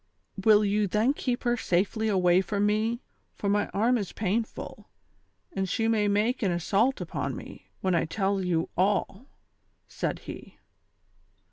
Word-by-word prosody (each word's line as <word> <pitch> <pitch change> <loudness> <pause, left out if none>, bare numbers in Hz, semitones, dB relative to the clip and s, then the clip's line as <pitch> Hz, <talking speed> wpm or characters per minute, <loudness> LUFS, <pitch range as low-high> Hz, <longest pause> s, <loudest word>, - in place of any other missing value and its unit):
203 220 - +5
"Will 210 0 +6
you 205 +1 +1
then 215 +8 +2
keep 250 -3 -3
lier 240 0 +3
safely 210 +1 0
away 185 -3 +4
from 200 +1 -1
me, 220 +3 0 0.3
for 205 - -4
my 205 +1 +2
arm 235 +4 +1
is 200 - -4
painful, 220 +3 -3 0.6
and 190 -7 -2
she 225 +2 0
may 215 -2 +2
make 210 +5 +1
an 195 -5 +1
assault 200 +9 +1
upon - - -3
me, - - -10
when 185 -1 +1
I 170 - +2
tell 195 +3 -1
you 170 -2 0
all 195 +1 +1
V 255 - -21 0.3
" - - -46 0.3
said - - -3
he. - - -9
205 Hz, 165 wpm, -27 LUFS, 190-225 Hz, 0.6 s, Will